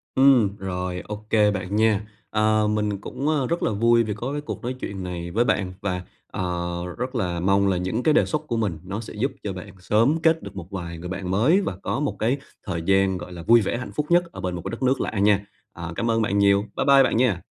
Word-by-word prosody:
Ừm, 125 -7 +5
rồi, 90 -2 -3
ô 105 0 -6
kê 105 -1 +4
bạn 95 0 -3
nha. 110 -1 +2 0.2
Ờ, 110 0 +2
mình 105 -2 -1
cũng, 140 +7 -3
a, 150 -4 +1
rất 170 +1 -1
là - - +1
vui 115 +3 +4
vì 105 -2 -2
có 120 +6 -4
cái 145 0 -3
cuộc 150 - -6
nói 125 +2 -3
chuyện 95 -5 -5
này 85 -1 -5
với 115 +6 +2
bạn 95 -5 0
và, 90 -2 -2 0.3
ờ, - - -4 0.5
rất 125 +2 -4
là 90 -7 -1
mong 100 +3 +3
là 95 -2 +2
những 95 +7 -2
cái 155 - +4
đề - - +4
xuất 155 - -1
của 120 - -1
mình 100 -8 -1
nó 100 +3 -4
sẽ 115 - -8
giúp 125 +6 -1
cho 100 - -3
bạn 90 -1 -9
sớm 115 - +2
kết 160 0 +3
được 100 -1 -9
một 90 0 -8
vài 85 -3 -5
người 90 +2 -7
bạn 95 -1 -4
mới 130 - +4
và 140 - -3
có - - -1
một 145 -1 -1
cái 120 +5 +1 0.3
thời 85 -5 -3
gian, 95 +1 +2
gọi 90 - -8
là, 85 -2 -8
vui 115 +5 +6
vẻ, 105 - -1
hạnh 120 - -6
phúc 150 - 0
nhất 175 +1 +5
ở - - -8
bên 90 -1 -2
một 85 - -5
cái - - -2
đất 115 +3 -5
nước 130 +1 +2
lạ - - -2
nha. 100 0 +4 0.3
À, 85 -1 -6
cảm 115 +5 0
ơn 115 0 +2
bạn 100 -2 0
nhiều. 100 0 +5
Bye - - 0
bye 140 -1 +7
bạn 130 - +1
nha. 115 -8 +1
105 Hz, 265 wpm, -24 LUFS, 95-120 Hz, 0.5 s, bye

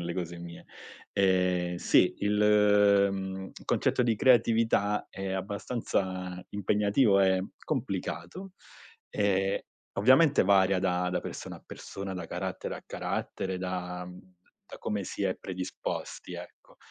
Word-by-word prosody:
le 85 0 -4
cose 85 -2 -4
mie. 85 0 -10 0.5
Ehm, 90 -2 +2
sì, - - +3
il, 105 -1 +4
mhmm, 95 0 -5 0.2
concetto - - +2
di 115 -2 +1
creatività 115 -4 +3
è 95 0 -5
abbastanza 95 -2 -3
impegnativo, 105 +2 +2
è 95 -1 +4 0.3
complicato, 190 +1 -4 0.6
ehm, 95 -1 +1 0.4
ovviamente 130 - +5
varia 95 -1 +4
da 90 -1 0
da 90 - 0
persona - - -7
a - - -18
persona, 100 -1 -7
da 90 - -5
carattere - - -4
a - - -11
carattere, 95 -1 -3
da, 90 -1 -4
uhm, 90 0 -11 0.5
da - - -11
come 105 -2 -2
si 100 - -4
è 95 -1 +1
predisposti, 90 -1 -5
ecco. - - -12
95 Hz, 125 wpm, -29 LUFS, 90-105 Hz, 0.6 s, ovviamente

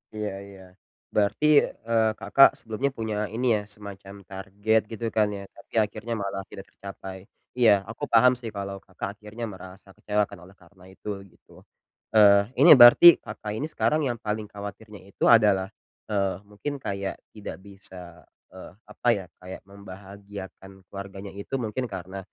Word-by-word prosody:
Iya 105 -2 -3 0.2
iya. 95 -1 -14 0.5
Berarti, 105 +8 +2 0.2
eee, 115 0 0
Kakak 135 - +6
sebelumnya 120 +5 -2
punya 110 -4 -4 0.2
ini 125 +2 -1
ya, - - -7
semacam 100 -1 -10
target 100 +3 0
gitu 115 +1 -5
kan 105 -1 +3
ya? 100 -1 -6
Tapi - - -18
akhirnya 110 +2 -2
malah 100 -1 -4
tidak 95 - -10
tercapai. 95 -1 -10 0.3
Iya, 120 -4 +5 0.2
aku 110 - -9
paham 125 +2 +6
sih 115 -3 -6
kalau 100 -1 -5
Kakak 100 +1 -7
akhirnya 110 +3 -9
merasa 95 -1 -11
kecewa 105 0 0
kan - - -12
oleh 95 +2 -16
karena 90 +1 -21
itu 95 - -16 0.2
gitu. - - -20 0.5
Eee, 100 +1 +6
ini 165 +5 +8
berarti 120 +8 +10 0.2
Kakak 105 0 -7
ini 150 +7 -3
sekarang 155 +1 +1
yang 120 -1 -2
paling 105 -1 -4
khawatirnya 105 +1 -9
itu - - -6
adalah, 105 -5 +5 0.4
eee, 100 -2 0
mungkin 105 +8 -6
kayak 100 -4 -4 0.2
tidak 105 - -7
bisa, 95 -3 -7 0.3
eee, 95 -1 -11 0.2
apa - - -6
ya, 95 - -6
kayak 90 +1 -9
membahagiakan 100 0 -11 0.2
keluarganya 100 0 -8
itu 100 +7 -6
mungkin 120 +3 -3
karena 95 -1 -7
100 Hz, 155 wpm, -25 LUFS, 95-110 Hz, 0.5 s, berarti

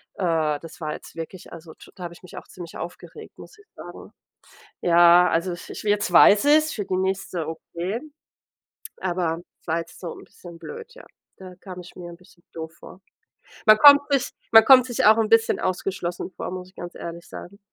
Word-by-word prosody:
Äh, 160 -5 0
das 165 +1 -13
war 155 -1 -3
jetzt - - -12
wirklich 165 +2 -9
also 165 -1 -12
t - - -17
da 180 - -10
habe 170 - -8
ich - - -20
mich 180 - -13
auch - - -10
ziemlich 175 -2 -11
aufgeregt, 170 +2 -10
muss - - -14
ich 410 - -20
sagen. - - -12 0.7
Ja, 175 +1 +5
also 170 +3 -1
i - - -5 0.2
ich - - -8
wi - - -2
jetzt 205 0 0
weiß 205 +3 +6
ich 295 +1 +6
es, 310 0 -2
für 205 - -4
die 185 -1 -2
nächste, 190 -3 -3
okay, 170 +6 -5 1.0
aber 175 -3 -2 0.2
es - - -33
war 165 +1 0
jetzt 165 0 -9
so 180 - -6
'n - - -13
bisschen 170 -2 -14
blöd, 465 - -10
ja. - - -14 0.3
Da 185 -1 -11
kam 185 -2 -10
ich 175 - -14
mir 175 -1 -9
'n 170 - -12
bisschen 175 -1 -23
doof 160 -1 -8
vor. 185 - -14 0.7
Man 215 0 +7
kommt 285 +1 +8
sich 275 -3 +1 0.2
man 225 0 +9
kommt 260 -2 +8
sich 240 -4 -1
auch 215 +1 +7
'n 220 -1 0
bisschen 225 0 +3
ausgeschlossen 185 -1 -4
vor, - - -5
muss 180 0 -7
ich - - -34
ganz 175 0 -8
ehrlich 170 0 -9
sagen. 200 +3 -11
180 Hz, 215 wpm, -23 LUFS, 170-210 Hz, 1.0 s, man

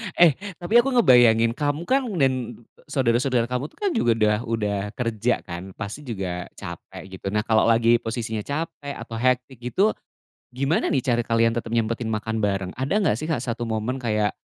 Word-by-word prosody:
Eh, 175 -3 +7 0.2
tapi 215 +7 +3
aku 265 +1 +1
ngebayangin, 120 - +6
kamu 145 +5 -2
kan 260 +4 +1
dan 130 -5 0 0.2
saudara-saudara 125 -2 +1
kamu 125 +4 -1
tuh - - -25
kan 405 -2 0
juga 120 - +2
udah 105 -1 +2
udah 105 -3 -1 0.2
kerja 115 0 -1
kan, 90 +2 -8
pasti 110 +7 -7
juga 90 -5 -4
capek - - -9 0.2
gitu. - - -6
Nah 105 - +2
kalau 110 -1 +3
lagi 115 0 +4
posisinya 115 -1 -3
capek 145 +2 -5
atau 115 - -8
hektik 125 0 0
gitu, 190 - +1 0.6
gimana 135 +6 0
nih 130 - +1
cara 120 -1 +2
kalian 115 0 +2
tetep 115 -1 -4
nyempetin 115 0 -1
makan 110 0 -2
bareng? 95 -2 -1
Ada 130 +7 -2
nggak 180 - +2
sih 155 +8 -4
Kak 155 - +1
1 120 0 -3
momen 115 +3 -2
kayak, 105 -3 0
120 Hz, 180 wpm, -24 LUFS, 110-135 Hz, 0.6 s, Eh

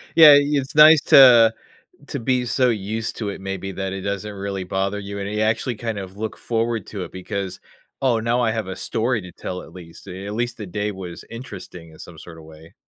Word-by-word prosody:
Yeah, 155 -3 +10
it's 145 -2 -1
nice 155 0 +8
to 120 -4 +7 0.5
to - - -4
be 125 +1 0
so 125 +1 +2
used 110 0 -3
to 105 -3 -3
it 100 - -6
maybe 95 0 -5
that 95 0 -4
it 95 - -5
doesn't 100 +2 -4
really 100 -1 -4
bother 95 +2 -2
you, 100 0 -7
and 100 0 -4
ya 105 0 0
actually 110 +3 -1
kind 115 0 -4
of 95 0 -9
look 110 +1 -5
forward 115 -3 -2
to 100 -4 -6
it, - - -13
because, 95 0 -5 0.4
"Oh, 125 -4 +2
now 115 +2 0
I 115 -2 +1
have 110 -3 -3
a 95 - -5
story 115 +3 -1
to 90 -1 -11
tell 90 +2 -6
at - - -14
least. 85 -2 -13
Uh, - - -7 0.2
at 105 - -5
least 120 +2 -3
the 105 - -6
day 105 +3 -3
was 90 -3 -9
interesting 95 -8 -10
in 80 - -17
some 85 - -11
sort 80 +1 -12
of 80 - -13
way." 80 +1 -15
105 Hz, 230 wpm, -22 LUFS, 95-115 Hz, 0.5 s, Yeah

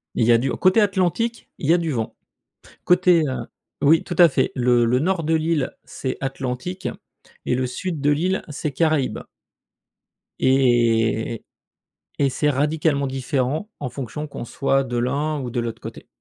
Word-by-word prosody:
Il 115 - +2
y 120 - +6
a - - +7
du 130 +2 -1
côté 185 +4 +3
Atlantique, 205 +4 0
il 145 - -1
y - - +8
a 175 - +4
du 165 -2 -2
vent. 115 -6 -3 0.7
Côté, 180 -2 +4
heu 130 - -4 0.4
oui, 160 +3 +5
tout 175 - -5
à 175 -1 +9
fait, 145 - 0
le 120 -1 +3
le 120 +2 +2
nord 175 +4 0
de 160 +2 +1
l'île, 160 -3 0
c'est 130 -1 -4
Atlantique, 135 +7 -4 0.6
et - - +1
le 130 0 0
sud 155 +6 -4
de 145 +1 +2
l'île, 180 +6 0
c'est 150 0 -4
Caraïbes. 155 -1 0 1.2
Et - - 0
et 120 -4 +3
-et - - -4
et. 115 - -10 0.7
Et 140 -1 +2
c'est 150 +3 0
radicalement 145 0 +1
différent 135 - -2
en 130 -3 -4
fonction 140 +4 -5
qu'on 140 -4 -7
soit 135 +2 +1
de 120 -1 -4
l'un 140 +5 -1
ou 125 -2 -4
de 120 - -1
l'autre 115 -1 -5
côté. - - -9
140 Hz, 180 wpm, -22 LUFS, 125-165 Hz, 1.2 s, à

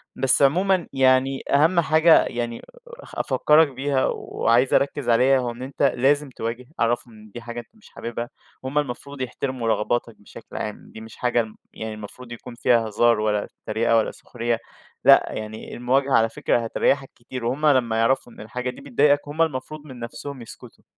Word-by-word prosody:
بس 135 +1 +2
عمومًا 180 +6 +3
يعني 130 0 +3
أهم 160 +5 +4
حاجة 160 0 +5
يعني 120 -1 -4
أ - - -14 0.6
أفكرَك 155 +1 +4
بيها 135 0 0
وعايز 120 +3 +1
أركز 140 -2 +1
عليها 130 +3 +4
هو 125 -1 -2
إن 120 +2 -11
أنت 135 +2 -4
لازم 140 +3 +2
تواجه، 115 0 -5
عرَّفهم 120 0 0
إن 110 -1 -15
دي 120 - -7
حاجة 120 0 -6
أنت 120 - -11
مش 220 - -19
حاببها، 120 +1 -6 0.3
وهم 130 +3 -4
المفروض 140 0 -5
يحترموا 130 -1 -3
رغباتَك 115 +1 0
بشكل 100 - -12
عام، 105 - -6
دي 110 - -9
مش 110 0 -11
حاجة 120 -2 +1 0.3
يعني 110 0 -6
المفروض 110 +4 -10
يكون 120 +1 -9
فيها 115 -1 +2
هزار 115 +1 +3
ولا 105 -1 0 0.2
تريقة 115 +1 +2
ولا 110 - +1
سخرية 120 -1 -3 0.5
لأ، - - +7
يعني 110 0 -7
المواجهة 130 +3 +1
على 115 0 +4
فكرة 115 - 0
هتريَّحَك 135 +4 0
كتير، 120 0 -7
وهم 135 +6 -1
لمَّا 120 -6 +3
يعرفوا 120 +1 +1
إن - - -12
الحاجة 125 +4 -4
دي 125 - -9
بتضايقَك 145 +2 +2
هم 150 +3 -2
المفروض 155 0 -2
من 130 -4 -11
نفسهم 130 +3 -7
يسكتوا. 115 - -13
125 Hz, 175 wpm, -23 LUFS, 115-140 Hz, 0.6 s, لأ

